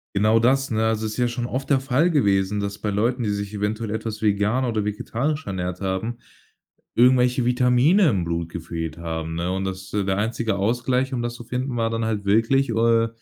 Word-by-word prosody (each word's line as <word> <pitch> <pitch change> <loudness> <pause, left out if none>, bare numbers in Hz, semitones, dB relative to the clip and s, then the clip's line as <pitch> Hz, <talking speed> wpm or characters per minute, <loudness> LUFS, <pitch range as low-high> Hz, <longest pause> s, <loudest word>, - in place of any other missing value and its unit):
Genau, 110 +3 +4
das, 135 +4 +2
ne, 110 0 0
also, 110 0 0
es 110 - -4
ist - - -8
ja 125 -1 +2
schon 120 0 -3
oft 135 +3 -4
der 135 - +5
Fall 135 +6 +2
gewesen, 100 -7 +2
dass 100 0 -3
bei 105 - -3
Leuten, 120 +5 0
die 105 - 0
sich 100 0 -3
eventuell 105 +2 -2
etwas 110 0 -4
vegan 105 +4 +1
oder 110 -4 -1
vegetarisch 140 +9 -2
ernährt 90 -1 -4
haben, 100 +5 -2 0.8
irgendwelche 125 +1 +4
Vitamine 125 +9 +4
im 95 -6 0
Blut 85 0 -3
gefehlt 80 -1 -5
haben, 80 -1 -4
ne? 85 +2 -2
Und 95 +1 -2
das 95 0 -5
der 95 -2 0
einzige 110 -1 -1
Ausgleich, 125 +5 0
um 120 -2 -2
das 120 - -3
zu 120 - -9
finden, 125 +2 -3
war 115 -1 +1
dann 115 0 -2
halt 105 -2 -2
wirklich, 115 +7 +3
äh, 115 0 +3
110 Hz, 205 wpm, -23 LUFS, 100-125 Hz, 0.8 s, der